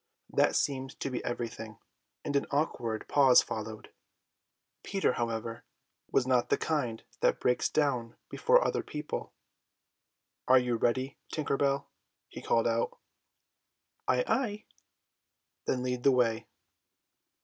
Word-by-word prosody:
That - - +3
seemed 135 -2 -1
to 135 - -2
be 125 - -3
everything, 115 -3 -5 0.5
and 145 - -2
an 140 - +1
awkward 120 -7 -1
pause 135 -3 +6
followed. 110 -1 -6 0.9
Peter, 195 -9 +1
however, 115 0 -3 0.5
was 130 - +3
not 125 -2 +2
the - - +3
kind 125 -8 -1 0.2
that - - +2
breaks 125 - +1
down 125 -6 0
before - - +3
other - - 0
people. 150 0 -5 1.2
"Are 130 - +7
you 125 -1 +2
ready, 130 +4 0
Tinker 150 -3 -1
Bell?" 140 0 +1 0.4
he - - -9
called 115 - +2
out. 115 0 0 1.1
"Ay, 125 -1 +3
ay." 215 -6 -1 1.0
"Then 125 -1 0
lead 125 -1 -2
the 135 - +5
way." 120 -3 +1
125 Hz, 125 wpm, -30 LUFS, 115-140 Hz, 1.2 s, Are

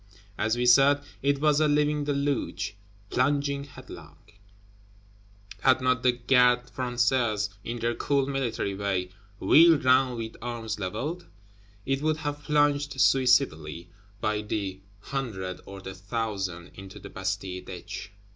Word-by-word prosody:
As 110 +3 0
we 125 - 0
said, 140 +3 +5 0.2
it 140 0 +1
was 150 0 +3
a 155 - +4
living 150 0 +1
deluge, 140 -6 -2 0.4
plunging 140 +1 +1
headlong; - - -12 1.4
had 130 -1 +4
not 130 -1 +1
the 125 0 +4
Gardes 125 0 +3
Françaises, 120 -4 0
in 120 +1 -4
their 120 0 -1
cool 140 +2 0
military 130 -7 -2
way, 95 -2 -2 0.3
"wheeled 165 -3 +6
round 130 -1 +4
with 115 -1 -5
arms 115 -2 -4
leveled," 125 - -4 0.6
it 135 +1 0
would 155 0 +1
have 145 -1 -4
plunged 145 -2 +1
suicidally, 90 - +2 0.3
by 105 -1 0
the 100 -3 -3 0.2
hundred 100 -10 -4
or 100 0 -8
the 95 0 -7
thousand, 95 -3 -4
into 95 0 -11
the - - -10
Bastille 95 -1 -4
ditch. 95 +2 -8
125 Hz, 130 wpm, -27 LUFS, 100-140 Hz, 1.4 s, wheeled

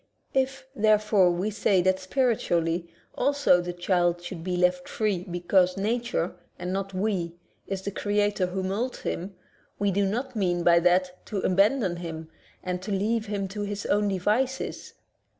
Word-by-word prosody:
If, 265 0 0
therefore, 210 -4 +4
w^e 185 +5 -1
say 195 -3 +2
that 185 +1 +2
spiritually 180 -7 0 0.2
also 280 -9 +3
the 175 0 -4
child 175 -1 +1
should 175 -2 -7
be 180 0 -1
left 180 0 +1
free 200 -5 -1
because 180 +1 +2
nature 230 -3 -1
— - - -40
and 180 +1 -4
not 195 0 -2
we 185 -4 -1 0.2
— - - -41
is 195 -1 -4
the 200 - -3
creator 205 -1 0
who 190 +1 -3
molds 215 +7 -2
him, 190 +3 -4 0.4
we 205 -1 +1
do 200 +1 +1
not 245 +6 -3
mean 175 -4 0
by 170 0 +6
that 180 +1 +1
to 200 -3 -2
abandon 195 0 +2
him 160 -2 -6 0.3
and 180 +1 -4
leave 215 +3 0
him 200 -1 -2
to 205 +2 -5
his 205 0 -4
own 205 0 +2
devices. 215 +8 -1
195 Hz, 165 wpm, -26 LUFS, 180-210 Hz, 0.4 s, by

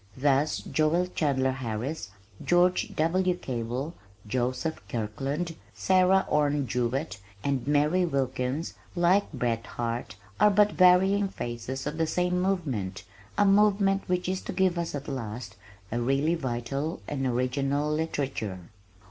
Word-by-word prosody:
Thus 145 +2 +2
Joel 160 +3 +1
Chandler 130 -4 +1
Harris, 125 -1 -4 0.3
George 180 +1 +3
W. 180 +3 +2
Cable, 125 +2 -4 0.3
Joseph 130 +8 -2
Kirkland, 135 +9 -3 0.2
Sarah 190 0 +4
Orne 145 -1 +2
Jewett, 125 -1 -2 0.2
and 140 -2 -1
Mary 150 +5 +3
Wilkins, 135 -1 -1 0.2
like 180 +3 +3
Bret 120 -5 -1
Harte, 120 -2 -4 0.2
are 210 - +7
but 210 +1 +4
varying 190 +2 +5
phases 120 -4 -5
of 150 +2 -4
the 160 - +2
same 180 +2 +1
movement, 135 - -2 0.3
a 205 - +5
movement 200 -1 +4
which 180 0 0
is 185 0 -1
to - - -5
give 180 -1 +2
us 170 -3 -3
at 140 0 -6
last 115 -6 -5 0.4
a 120 +2 -1
really 135 +6 +2
vital 135 +1 -3
and 135 -2 -1
original 135 +4 0
literature!" 140 -10 -2
145 Hz, 130 wpm, -28 LUFS, 125-180 Hz, 0.4 s, are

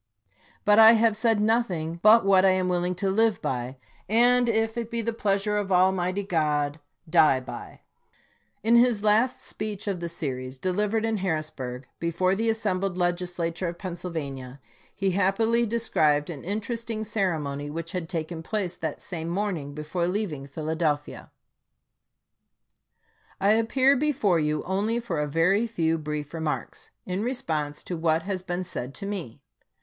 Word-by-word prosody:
] - - -33
But 210 +1 +6
I 225 +1 +10
have 225 -1 +3
said 220 0 +2
noth 225 +2 +2
ing 165 -1 -4
but 215 +1 +7
what 190 -1 +5
I 195 - +6
am 185 -1 +1
willing 180 0 0
to 190 +2 -1
live 220 0 +2
by, 125 +1 -3 0.3
and, 245 +2 +4
if 225 0 +1
it 235 -1 -3
be 235 - -1
the 230 +1 -1
pleasure 210 -1 0
of 200 -2 -2
Almighty 185 +1 +2
God, 150 -4 0 0.3
die 155 -5 +5
by. 130 - -9 0.8
In 230 +2 +4
his 235 -3 +3
last 220 +4 +2
speech 210 -2 -4
of 195 -4 -2
the 170 0 -4
series, 130 -5 -5
delivered 210 +8 0
in 225 -1 0
Harrisburg, 155 -8 -3
before 175 +3 +1
the 225 +3 0
assembled 195 -4 -1
Legislature 175 -1 -1
of 170 0 -5
Pennsylvania, 155 -8 -6 0.4
he 195 -1 0
happily 220 +5 +2
described 155 -10 +1
an 145 -5 -8
interesting 220 +3 -3
ceremony 160 -10 -2
which 165 +2 -5
had 180 -4 -4
taken 165 -1 -4
place 190 0 -2
that 160 -4 -5
same 165 -2 -5
morn 200 +2 -1
ing 145 -1 -7
before 155 +3 -2
leaving 180 -8 -3
Philadelphia: 155 0 -2 2.1
I 200 - +2
appear 255 +5 +3
before 260 - +2
you 150 0 0
only 205 +5 0
for 220 -10 -3
a 150 - -1
very 180 +9 +2
few 165 -7 0
brief 150 -1 -5
remarks, 160 -2 -4 0.2
in 185 +2 -2
response 160 - -2
to 180 - -4
what 160 0 +1
has 190 -2 -3
been 180 0 -3
said 135 -7 -5
to - - -6
me. 165 - -5
185 Hz, 160 wpm, -26 LUFS, 160-215 Hz, 2.1 s, I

